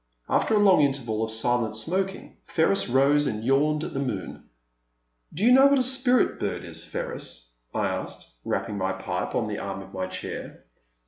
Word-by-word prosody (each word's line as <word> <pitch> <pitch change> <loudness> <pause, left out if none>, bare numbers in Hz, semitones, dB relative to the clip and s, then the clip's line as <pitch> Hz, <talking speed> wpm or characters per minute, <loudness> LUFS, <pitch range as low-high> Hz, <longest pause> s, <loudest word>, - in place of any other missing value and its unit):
After 220 - +2
a - - +4
long 195 -6 +5
interval 125 -6 0
of 110 - -2
silent 115 0 0
smoking 190 - -2
Ferris 165 -1 +1
rose 140 +3 +3
and 110 0 -3
yawned 150 +4 +2
at - - -5
the 135 - -2
moon. 125 -9 -5 0.8
Do 185 +8 -1
you 245 - +6
know 265 +2 +8
what 280 0 +4
a 260 - +3
Spirit 255 -1 +2
bird - - -3
is, - - -4
Ferris? - - -6
" - - -47
I - - +1
asked, - - -5
rapping 100 - -2
my 95 0 0
pipe 90 -1 -4
on 115 - 0
the 105 -1 -4
arm 95 0 -5
of 95 - -15
my 95 -1 -3
chair. 95 - -7
135 Hz, 190 wpm, -26 LUFS, -, 0.8 s, know